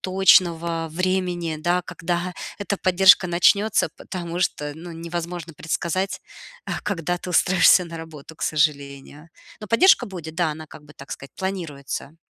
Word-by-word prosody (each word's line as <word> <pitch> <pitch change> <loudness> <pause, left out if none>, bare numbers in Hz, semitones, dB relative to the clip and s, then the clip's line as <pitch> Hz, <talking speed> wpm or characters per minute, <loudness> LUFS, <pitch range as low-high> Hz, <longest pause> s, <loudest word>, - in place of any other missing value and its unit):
точного 170 -3 +3
времени, 180 -2 -1
да, 175 +3 0
когда 175 +1 -3 0.3
эта 200 -1 -3
поддержка 185 0 +5
начнется, 180 +1 +3
потому 175 -2 -6
что, 150 -4 -1
ну, 170 +2 -9
невозможно 170 0 -6
предсказать, 170 +5 -2 0.4
а, - - -4
когда 175 -3 -2
ты 180 - -9
устроишься 180 +1 +5
на 165 -1 -8
работу, 160 -1 -11
к - - -24
сожалению. 145 0 -2 0.3
Но 210 - -7
поддержка 370 - +5
будет, 165 -5 -8
да, 175 -3 +1
она, 155 +1 -10
как 150 - -14
бы 150 - -17
так 140 - -13
сказать, 135 - -10
планируется. 165 -5 -5
170 Hz, 145 wpm, -23 LUFS, 160-185 Hz, 0.4 s, поддержка